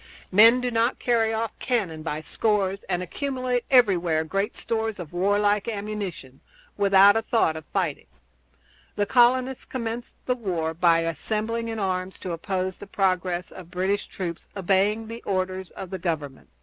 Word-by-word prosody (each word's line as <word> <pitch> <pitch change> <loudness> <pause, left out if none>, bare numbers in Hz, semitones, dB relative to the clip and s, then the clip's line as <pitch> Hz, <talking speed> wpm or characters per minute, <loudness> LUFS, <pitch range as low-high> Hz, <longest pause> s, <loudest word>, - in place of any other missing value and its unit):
Men 225 +6 +7
do 250 0 -1
not 230 +2 +1
carry 230 -2 +1
off 225 0 -1
cannon 195 -11 -1
by 155 -1 -3
scores, 200 +3 0
and 180 0 -1
accumulate 255 - -2
everywhere 180 -11 +4
great 195 +7 -2
stores 225 -2 -2
of 175 -3 -8
warlike 205 +3 +2
ammunition, 200 - -5 0.3
without 200 0 +6
a 225 - +2
thought 220 -8 +1
of 160 -1 -8
fighting. 175 -7 -2 0.9
The 205 - +1
colonists 255 +3 +3
commenced 235 -1 -5
the 250 - +2
war 175 -9 -2
by 165 0 +4
assembling 220 +8 -2
in 225 - -4
arms 185 -2 -2
to 185 - -4
oppose 185 +2 -2
the 205 - -10
progress 185 -3 0
of 180 -3 -11
British 190 +3 -1
troops 170 -3 -6
obeying 200 +4 +1
the 230 +1 -7
orders 185 -1 -2
of 190 - -9
the 190 - -4
Government. 155 -6 -4
195 Hz, 155 wpm, -25 LUFS, 180-225 Hz, 0.9 s, Men